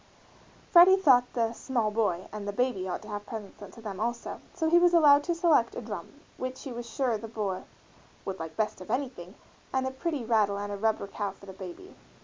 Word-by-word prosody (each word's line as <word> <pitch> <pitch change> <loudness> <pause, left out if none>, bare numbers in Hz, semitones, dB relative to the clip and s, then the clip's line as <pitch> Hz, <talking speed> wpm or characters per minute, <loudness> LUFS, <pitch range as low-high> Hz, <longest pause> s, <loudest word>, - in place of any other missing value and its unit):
Freddie 370 +1 +9
thought 255 -9 +5
the 230 -2 0
"small 235 -3 -1
boy" 205 -5 0
and 210 -1 -6
the - - -1
"baby" 205 -4 -1
ought - - -4
to - - -11
have 205 -1 -5
presents 215 -3 -8
sent 205 - -10
to 230 - -12
them 200 -4 -6
also; 235 +2 -3
so 325 -3 -1
he 340 +2 +6
was 350 0 +5
allowed 290 -3 +7
to 345 +1 -1
select 325 -9 +3
a - - -4
drum, - - -6 0.3
which 255 0 -5
he 270 - -6
was 235 0 -6
sure 240 -3 0
the 225 - -7
boy 210 -4 -3 0.6
"would 190 -1 -4
like 160 -1 -7
best 215 -3 -1
of 185 - -10
anything," 245 -9 -3 0.4
and 260 0 0
a 260 - -1
pretty 280 -2 -3
rattle 215 -3 +2
and 205 0 -4
a - - -2
rubber 220 0 0
cow 200 0 -3
for 195 +1 -13
the 190 - -9
baby. 190 - -10
230 Hz, 225 wpm, -29 LUFS, 205-265 Hz, 0.6 s, Freddie